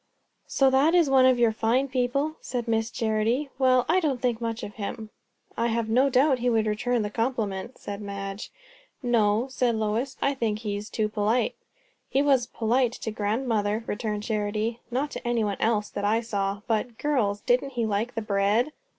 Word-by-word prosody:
"So 270 -1 +3
that 285 +6 +4
is 330 -6 +4
one 260 -1 +6
of 255 -1 +4
your 235 -2 +4
fine 230 +5 +1
people?" 275 +4 -1
said 240 -2 -4
Miss 225 0 0
Charity. 225 +6 0
"Well, 255 -1 +4
I 375 - +4
don't 290 -7 0
think 240 -2 -1
much 230 0 -3
of 205 - -6
him." 220 0 -6 0.4
"I 230 - +1
have 230 -1 -1
no 255 +5 +4
doubt 265 +1 +3
he 245 +1 +1
would 225 -2 +2
return 220 +2 0
the 205 - -4
compliment," 225 -2 -2
said 200 0 -7
Madge. 200 0 -6 0.5
"No," 230 -1 +2
said 245 -3 +1
Lois; 220 +5 -1
"I 280 - +1
think 230 -5 -1
he 210 -2 -3
is 205 +2 -6
too 215 -2 0
polite." 215 +3 0 0.6
"He 270 +2 +2
was 265 -4 +3
polite 240 +1 +1
to 220 - -5
grandmother," 215 0 -1
returned 210 -1 -3
Charity. 215 +1 -2
"Not 270 +4 -1
to - - -6
anybody 220 -4 0
else, 215 -2 +1
that 200 - -4
I 215 +3 +2
saw. 200 -3 -2
But, 225 0 -1
girls, 220 -9 0
didn't 255 +3 +1
he 235 -2 0
like 215 +3 -1
the 225 - -2
bread!" 210 +6 +1
230 Hz, 185 wpm, -26 LUFS, 210-255 Hz, 0.6 s, one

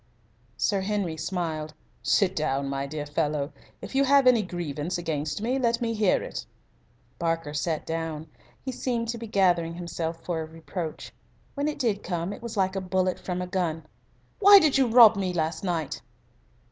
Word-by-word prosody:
Sir 200 -2 +1
Henry 195 -4 -1
smiled. 160 -2 -3 0.3
"Sit 190 -3 +2
down, 140 -3 0
my 140 0 -2
dear 150 +1 -5
fellow. 145 0 -1 0.3
If - - -7
you 270 +1 +3
have 275 0 +5
any 250 -3 +6
grievance 175 -3 -3
against 155 +1 -3
me, 255 +4 0
let 235 -2 +1
me 230 -1 -1
hear 210 -4 +2
it." - - -5 0.8
Barker 165 -3 -1
sat 155 +1 -2
down. 160 -1 -3 0.4
He 260 - -2
seemed 235 -2 -2
to 235 0 -3
be 230 - -6
gathering 175 -5 +2
himself 170 -1 -4
for 170 -2 -1
a - - -4
reproach. 165 +1 -6 0.4
When 285 0 -1
it 305 - -2
did 225 -7 0
come 175 +1 -3
it - - -10
was 230 -2 -6
like 190 0 +1
a 195 - -1
bullet 185 0 0
from 180 -1 -3
a - - -3
gun. 170 -4 -2 0.5
"Why 405 0 +10
did 310 -7 +4
you 270 -2 +4
rob 230 -1 +8
me 185 -2 -1
last 160 0 -1
night?" 170 -5 -2
180 Hz, 180 wpm, -26 LUFS, 160-220 Hz, 0.8 s, Why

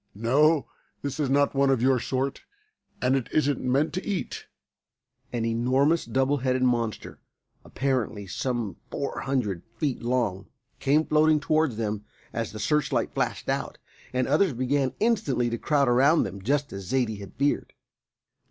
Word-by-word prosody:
No, 140 +8 +3 0.4
this 140 +1 -4
is 145 -3 +1
not 140 +1 +3
one 140 0 +3
of 135 -3 +3
your 130 +1 +3
sort, 130 +3 -2 0.6
and 130 +1 +3
it 130 -3 -1
isn't 145 -3 +1
meant 140 +4 +1
to 185 - -3
eat." 200 -4 -4 0.8
An 115 -2 -1
enormous 130 +8 +2
double 135 +5 +1
headed 130 -1 0
monster, 120 -4 -1 0.4
apparently 125 -7 -2
some 115 +2 -3
four 140 - -3
hundred 120 -10 -1 0.2
feet 140 0 -1
long, 115 -6 -1 0.3
came 150 +3 +3
floating 155 0 +4
towards 155 -5 +1
them 105 -2 -2 0.3
as 115 -4 -3
the 110 - -8
searchlight 145 +8 0
flashed - - -2
out, - - -2 0.3
and 130 0 0
others 190 -7 +3
began 130 +2 0
instantly 170 - +1
to 115 - -2
crowd 145 -3 +2
about 135 +7 +4
them, 100 0 -6
just 140 +7 0
as 95 -2 -7
Zaidie 115 -3 0
had 100 - -10
feared. 140 +1 0
130 Hz, 150 wpm, -26 LUFS, 115-145 Hz, 0.8 s, floating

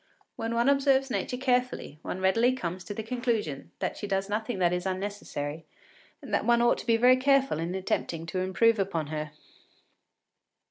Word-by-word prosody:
When 225 +1 -3
one 235 +2 +2
observes 275 -1 +3
Nature 250 - -2
carefully, 250 - -1
one 185 - -5
readily 230 +7 +3
comes 180 -7 -4
to 205 - -5
the 220 - -4
conclusion 225 - -2
that - - -3
she 205 - -5
does 195 0 -1
nothing 215 +1 -2
that 175 -1 +2
is 180 +1 -2
unnecessary, 185 -6 -4 0.6
and - - -8
that - - +2
one 235 0 +4
ought 240 0 +3
to - - -9
be 230 -1 +4
very 250 +2 +6
careful 270 - +2
in 170 +3 -3
attempting 170 -3 -2
to 175 +3 -3
improve 210 +4 +3
upon 170 -6 -1
her. 155 0 -3
210 Hz, 180 wpm, -28 LUFS, 180-245 Hz, 0.6 s, very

